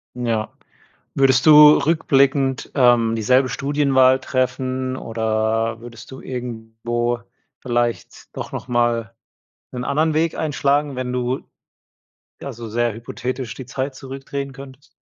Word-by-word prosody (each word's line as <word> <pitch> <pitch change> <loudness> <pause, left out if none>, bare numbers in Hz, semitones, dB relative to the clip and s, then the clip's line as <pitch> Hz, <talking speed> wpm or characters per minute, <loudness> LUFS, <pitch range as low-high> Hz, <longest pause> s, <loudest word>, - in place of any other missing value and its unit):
N 125 0 -4
ja. 110 -2 -1 0.7
Würdest 130 -1 +3
du 150 -1 +9
rückblickend, 135 -4 +1
ähm, 120 -4 +3
dieselbe 125 +4 +3
Studienwahl 135 -1 +2
treffen 130 0 -2
oder 110 0 -1
würdest 115 -1 -12
du 130 - -10
irgendwo 120 -1 -4 0.4
vielleicht 120 -1 -3
doch - - -6
nochmal 120 -2 -1 0.6
'nen 125 -1 -5
anderen 155 +4 +1
Weg 160 +1 0
einschlagen, 145 -2 0
wenn 125 -1 -3
du, 125 +1 -2 1.0
ja, 140 - -5
so 115 -1 -8
sehr 120 +1 -1
hypothetisch, 125 +1 -5
die 130 - -8
Zeit 130 +2 -4
zurückdrehen 135 +1 -6
könntest. 135 0 -13
130 Hz, 120 wpm, -21 LUFS, 120-135 Hz, 1.0 s, du